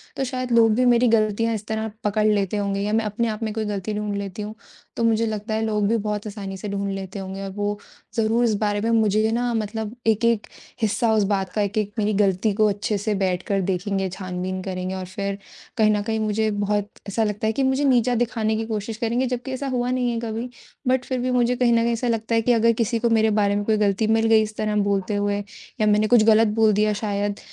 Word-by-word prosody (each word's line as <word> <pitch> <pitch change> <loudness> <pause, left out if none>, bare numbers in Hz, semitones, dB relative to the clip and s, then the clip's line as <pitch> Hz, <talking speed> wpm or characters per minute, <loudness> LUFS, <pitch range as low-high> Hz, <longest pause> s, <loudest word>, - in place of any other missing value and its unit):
तो - - -1
शायद 255 -1 -3
लोग 230 -1 +5
भी 250 +2 +2
मेरी 245 0 +4
गलतियाँ 225 0 +2
इस 210 0 -6
तरह 220 0 -2
पकड़ 210 +1 +1
लेते 205 -1 +1
होंगे 200 -1 -1
या 210 +1 -1
मैं 225 -1 +1
अपने 225 +3 -1
आप 220 +1 -3
में 215 -1 -2
कोई 220 -1 -2
गलती 205 0 -3
ढूँढ 210 -1 -2
लेती 200 0 -5
हूँ, 210 +1 -6 0.4
तो 230 - -1
मुझे 230 0 +2
लगता 215 0 -3
है 220 - 0
लोग 210 -2 0
भी 230 - +2
बहुत 210 -1 -3
आसानी 195 -2 -6
से 210 +2 -6
ढूँढ 200 0 -2
लेते 195 0 -6
होंगे 195 +1 -6
और 195 - -4
वो 205 0 -1 0.4
ज़रूर 225 +1 +2
इस 225 -2 +2
बारे 205 -1 0
में 225 - 0
मुझे 215 -1 +3
ना 240 +1 0
मतलब 220 0 -3
1-1 225 0 +2 0.3
हिस्सा 220 +2 +1
उस 215 -1 +3
बात 190 -1 -1
का 210 - 0
1-1 205 0 -1
मेरी 215 0 +1
गलती 200 +1 +2
को 215 +1 +3
अच्छे 205 +1 -1
से 210 +2 -1
बैठकर 190 +1 0
देखेंगे 190 +1 -1
छानबीन 185 0 -4
करेंगे 185 0 -4
और 185 -1 -5
फिर, 200 +2 -4 0.4
कहीं 215 -1 +4
न 210 -1 +1
कहीं 220 +1 -1
मुझे 215 0 0
बहुत 205 0 -1 0.2
ऐसा 210 +3 0
लगता 210 +1 -1
है 220 - +1
कि 270 - 0
मुझे 265 +2 +1
नीचा 250 -2 +3
दिखाने 225 -2 0
की 225 0 -2
कोशिश 215 0 -4
करेंगे। 235 +2 0
जबकि 250 +1 -4
ऐसा 270 +1 -3
हुआ 250 -1 -1
नहीं 250 -1 0
है 230 - -2
कभी 230 +1 -4 0.4
बट 255 -1 +2
फिर 255 -1 -2
भी 255 +1 -1
मुझे 250 0 +2
कहीं 240 -1 +3
न 230 0 +3
कहीं 235 0 +1
ऐसा 240 +2 -2
लगता 230 0 0
है 225 - +3
कि 245 +2 +3
अगर 230 0 +4
किसी 230 0 0
को 235 0 +1
मेरे 220 -1 +3
बारे 200 0 +2
में 205 - 0
कोई 220 -1 +2
गलती 205 +1 +1
मिल 225 0 +2
गई 225 -1 +5
इस 215 0 -6
तरह 215 -1 -1
बोलते 200 0 0
हुए 205 0 0 0.4
या 215 - +3
मैंने 210 +1 +3
कुछ 235 -1 +5
गलत 220 0 +5
बोल 220 -1 +5
दिया 210 +1 +2
शायद 205 -1 -1
215 Hz, 245 wpm, -23 LUFS, 205-230 Hz, 0.4 s, लोग